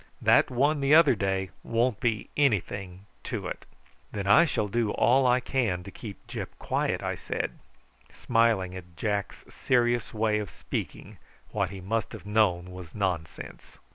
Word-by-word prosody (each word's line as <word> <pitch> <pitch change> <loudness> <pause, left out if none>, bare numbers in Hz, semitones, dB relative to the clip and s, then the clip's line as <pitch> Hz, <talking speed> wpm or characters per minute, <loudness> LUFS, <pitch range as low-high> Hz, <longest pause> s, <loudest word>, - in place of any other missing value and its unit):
That - - +4
one 145 +4 +2
the 140 +2 +5
other 160 -4 +7
day 95 -2 -1
won't 115 -1 0
be 115 -3 -1
anything 100 -8 0 0.2
to - - -4
it." - - -6 0.4
"Then 100 -2 -4
I 105 +12 +7
shall 110 -9 -1
do 115 +1 0
all 130 +5 +3
I 125 0 +4
can 115 -9 -1
to 100 - -9
keep 105 -2 -10
Gyp - - -5
quiet," - - -1
I - - -1
said, - - -3 0.6
smiling 115 -6 +1
at 90 -2 -11
Jack's 100 -2 -2
serious 120 -2 +1
way 110 -1 +1
of 105 -3 -5
speaking - - -6 0.3
what 100 -4 0
he 95 0 -8
must 110 +3 -2
have - - -9
known 95 -4 +1
was 90 -3 -10
nonsense. 90 -6 -4
105 Hz, 160 wpm, -27 LUFS, 95-120 Hz, 0.6 s, other